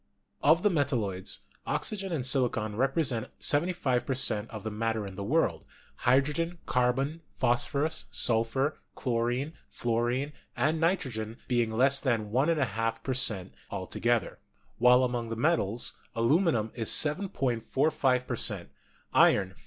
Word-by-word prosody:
Of 160 +4 +4
the 210 - +4
metalloids, 120 - -1 0.3
oxygen 195 -3 -2
and 145 -7 -1
silicon 120 -5 0
represent 130 -1 0
75 145 -5 +1
per 130 - -2
cent, 110 -4 0
of 110 -3 -8
the 110 - -4
matter 110 0 -2
in 100 - -7
the 100 - -5
world, 155 +11 +1 0.3
hydrogen, 150 +7 +1
carbon, 135 +6 0 0.2
phosphorus, 140 +6 +1
sulphur, 120 +6 +1 0.2
chlorine, 125 +4 -1 0.2
fluorine 120 +5 -1 0.2
and 155 +2 +1
nitrogen 125 - -1
be 120 -2 +2
ing 115 - -1
less 135 +5 +3
than 115 -6 -1
1^2 115 - 0
per 130 - -1
cent, 105 -8 +1 0.2
all - - -4
together; - - -1 0.4
while 125 +2 +6
among 120 -2 -2
the 115 - -3
metals, 120 - 0 0.2
aluminum 115 - +2
is 115 -3 -2
7.45 135 - +1
per 125 - -3
cent.: 100 -6 0 0.4
iron, 95 -2 +5
4. - - -21
125 Hz, 135 wpm, -29 LUFS, 115-145 Hz, 0.4 s, while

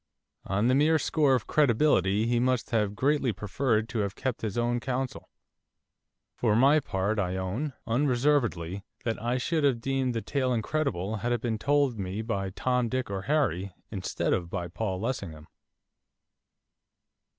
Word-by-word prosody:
On 100 +3 0
the 130 - +4
mere 150 +4 +4
score 145 -2 +2
of 125 - -2
credibility 115 - +3
he 120 0 +2
must 125 -1 0
have 105 -3 +1
greatly 140 0 +2
preferred 110 +2 0
to 120 - -2
have 100 -1 -1
kept 130 -3 -3
his 110 -2 -3
own 120 +1 +1
counsel. 130 +1 -3 1.0
For 110 -3 +1
my 140 +6 +5
part 105 -4 -1
I 90 -2 -1
own, 105 +11 -3
unreservedly, 120 - +1 0.2
that 115 -4 -2
I 120 +2 0
should 155 +5 0
have 135 -5 +3
deemed 130 0 -1
the 115 - -1
tale 130 -3 0
incredible 110 - -1
had 120 +4 -2
it 120 -2 0
been 115 -3 -2
told 140 -4 +2
me 95 +3 -3
by 100 -4 -2
Tom, 125 +4 0
Dick, 130 -4 -2
or 95 -1 -2
Harry, 100 - 0 0.2
instead 95 -4 -1
of 85 -2 -1
by 85 0 -3
Paul 95 +1 -3
Lessingham. 95 -10 -4
120 Hz, 160 wpm, -28 LUFS, 100-130 Hz, 1.0 s, my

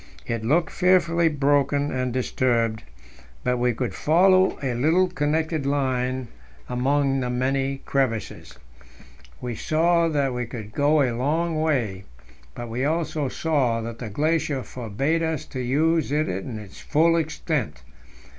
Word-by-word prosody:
It 115 -1 -3
looked 160 +8 +2
fearfully 170 -2 +3
broken 145 0 +1
and 130 -1 -1
disturbed, 120 -3 0 0.6
but 125 0 +1
we 125 0 +2
could 120 +1 -3
follow 185 +4 +4
a 130 -2 0
little 160 +10 +3
connected 155 -2 -1
line 130 -2 -1 0.4
among 135 +2 +1
the 125 -1 -2
many 135 +2 -1
crevasses; 130 - -2 0.8
we 125 -1 -3
saw 165 +7 +2
that 140 -4 0
we 125 -1 -3
could 110 -3 -8
go 145 +4 +3
a 125 -3 0
long 155 +5 0
way, 115 -12 -1 0.5
but 120 - -6
we 120 +3 -3
also 155 -2 -1
saw 135 -8 0
that 115 0 -6
the 115 - -5
glacier 150 +2 0
forbade 130 +8 -2
us 160 -3 -2
to 130 - -7
use 155 +5 +1
it 150 +1 +1
in 95 +6 -4
its 105 -3 -11
full 165 +2 +3
extent. 150 - -2
140 Hz, 140 wpm, -24 LUFS, 125-160 Hz, 0.8 s, follow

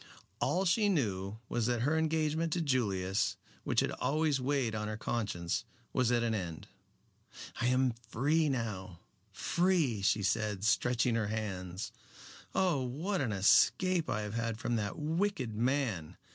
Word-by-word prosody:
All 190 +2 +1
she 205 +4 +3
knew 105 - -1
was 115 -2 0
that 120 -2 0
her 145 +4 +2
engagement 160 0 +1
to 175 - 0
Julius, 100 - 0 0.3
which - - +2
had - - 0
always 150 -2 0
weighed 130 -3 0
on 105 -1 -2
her 110 0 -4
conscience, 105 -7 -2 0.3
was 125 -2 +2
at 120 -1 +2
an 115 -1 +1
end. 90 -6 -4 0.9
"I 120 - +1
am 130 -1 +3 0.2
free 150 +6 +2
now 100 -9 -3 0.3
free," 165 - +1
she 100 +1 +2
said, 105 0 0
stretching 120 +2 +2
her 110 -2 0
hands. 95 -4 -4 0.6
"Oh, 180 -7 +2
what 160 +9 -2
an 125 -5 0
escape 165 - +4
I 105 - 0
have 105 0 -5
had 115 -1 -2
from 120 +1 -1
that 100 -2 -3
wicked 160 - -1
man. 115 - -1
120 Hz, 150 wpm, -32 LUFS, 105-155 Hz, 0.9 s, escape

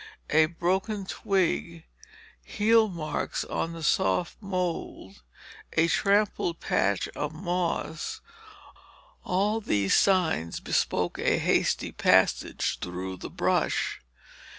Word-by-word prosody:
A 155 0 +5
broken 190 +5 -1
twig, 180 -5 -1 0.6
heel 220 +1 +3
marks 165 -4 -3
on 165 - -3
the 165 -1 -8
soft 135 - +1
mold, 180 - -4 0.5
a 165 0 +3
trampled 200 -2 +1
patch 100 0 0
of 150 +1 -4
moss; 170 -2 -3 1.0
all 205 +5 0
these 100 - +1
signs 165 - +2
bespoke - - -1
a - - +2
hasty - - +1
passage - - +2
through 90 +1 -5
the - - -7
brush. - - 0
170 Hz, 100 wpm, -27 LUFS, 155-195 Hz, 1.0 s, A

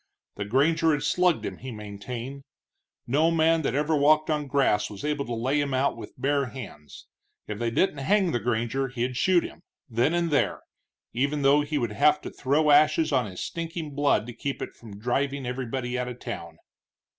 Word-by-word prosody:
The 100 - -4
granger 155 +8 +3
had 145 - -1
slugged 180 -2 +2
him, - - -5
he 130 - -7
maintained; 115 +5 -7 0.6
no 150 +7 +3
man 165 0 +3
that 140 - -1
ever 150 +2 +1
walked 155 +2 +4
on 150 -1 +1
the 145 - -8
grass 135 -7 +2
was 100 +5 -8
able 150 -2 -1
to 120 - -3
lay 130 +6 +1
him 140 -2 -1
out 135 +2 +1
with 115 - -11
bare 140 0 +1
hands. 100 - -10 0.4
If 105 -1 -6
they 120 -1 0
didn't 145 +5 +1
hang 190 +5 +2
the 120 - 0
granger 120 +3 -1
he'd 125 0 -3
shoot 175 +6 +3
him, - - -9 0.3
then 125 +6 +1
and 170 -1 0
there, 145 - +1 0.5
even 140 +4 0
though 140 +2 +5
he 145 +1 -2
would 120 -5 -1
have 150 +8 +3
to - - -7
throw 145 +3 +2
ashes 155 +2 +4
on 130 -5 +2
his 90 -2 -7
stinking 165 -2 -5
blood 145 -6 +2
to 120 - -8
keep 140 +3 -4
it - - -6
from 105 -4 -12
driving 135 +5 -1
everybody 125 0 -3
out 125 - -2
of 125 0 -7
town. - - -7
140 Hz, 200 wpm, -26 LUFS, 120-150 Hz, 0.6 s, though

